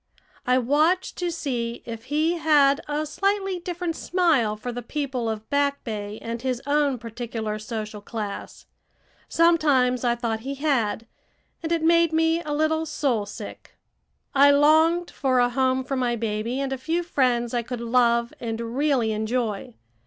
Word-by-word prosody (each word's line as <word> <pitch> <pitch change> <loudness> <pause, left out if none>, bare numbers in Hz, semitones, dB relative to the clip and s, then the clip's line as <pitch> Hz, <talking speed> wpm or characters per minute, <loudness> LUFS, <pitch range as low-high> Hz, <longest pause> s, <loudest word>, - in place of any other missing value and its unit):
I 250 0 +4
watched 305 +9 +2
to 355 -1 -1
see 245 -8 -3
if 230 0 -7
he 315 +5 0
had 290 -3 +4
a 295 +1 -1
slightly 390 +4 -1
different 350 -1 -4
smile 320 - +1
for 230 +4 -5
the 245 +1 -5
people 260 -2 -3
of 220 0 -5
Back 285 0 +1
Bay 210 -2 -5
and 230 0 -4
his 255 -1 -1
own 285 -2 +2
particular 230 -2 -5
social 215 -1 -6
class; 210 -1 -6 0.6
sometimes 290 -7 +3
I 240 -1 +2
thought 230 -2 -2
he 270 +5 -5
had, 260 -7 0 0.6
and 330 0 -4
it 335 -1 +1
made 335 0 +4
me 325 +1 +2
a 300 - -6
little 315 +2 +1
soul 255 -9 -1
sick. - - -10 0.6
I 280 +1 +6
longed 315 +4 +4
for 260 -2 0
a 245 0 +4
home 260 +1 +1
for 270 +1 -3
my 245 -2 0
baby 225 +2 -2
and 275 -1 -2
a 265 - -5
few 330 +6 -1
friends 250 -7 +1
I 240 - +1
could 245 +1 -6
love 235 0 +2
and 225 -1 -4
really 245 0 0
enjoy. 215 - -2
260 Hz, 160 wpm, -24 LUFS, 235-310 Hz, 0.6 s, I